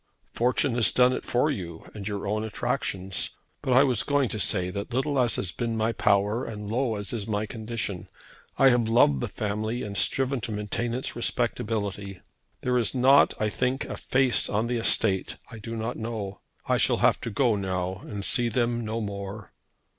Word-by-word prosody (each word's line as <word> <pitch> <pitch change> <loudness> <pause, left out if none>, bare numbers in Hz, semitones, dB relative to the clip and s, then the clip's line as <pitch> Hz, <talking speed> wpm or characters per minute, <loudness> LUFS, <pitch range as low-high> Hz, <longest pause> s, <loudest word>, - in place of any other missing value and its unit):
"Fortune 125 +2 +1
has 120 -2 +3
done 125 0 +4
it - - -3
for 125 +5 +1
you, 85 - -6
and 105 -2 -7
your 100 -1 -3
own 105 +2 -1
attractions. 95 -3 -3 0.2
But 130 -3 0
I 130 +2 +7
was 125 -6 +2
going 145 -4 +1
to 110 - -3
say 90 -2 +2
that 100 +5 -5
little 135 +3 0
as 120 -2 +3
has 90 - -1
been 115 +1 -3
my 110 +1 +1
power 105 +2 +2
and 105 -3 -6
low 120 -1 0
as 100 +1 -3
is 110 -4 -3
my 105 0 -1
condition, 110 -4 -4 0.5
I 135 - +6
have 120 -3 +2
loved 75 - +4
the - - -1
family 110 +3 -3
and 100 -1 -6
striven 135 +3 +1
to 110 - -4
maintain 105 +3 -2
its 130 - -2
respectability. 105 -5 -2 0.4
There 125 -1 +1
is 120 - 0
not, 135 +3 +5
I 110 - +1
think, 125 +5 -1
a - - -5
face 130 -1 +2
on 105 +3 0
the 120 0 -1
estate 100 -4 +3 0.2
I 115 - -8
do 115 +2 -7
not 115 +2 -3
know. 110 -4 -5 0.3
I - - +3
shall - - +3
have - - +3
to - - -3
go 115 +1 +2
now 95 -1 -3
and 100 -2 -5
see 120 -4 +3
them 120 0 0
no 110 +1 -3
more." 100 0 -6
110 Hz, 195 wpm, -26 LUFS, 100-125 Hz, 0.5 s, I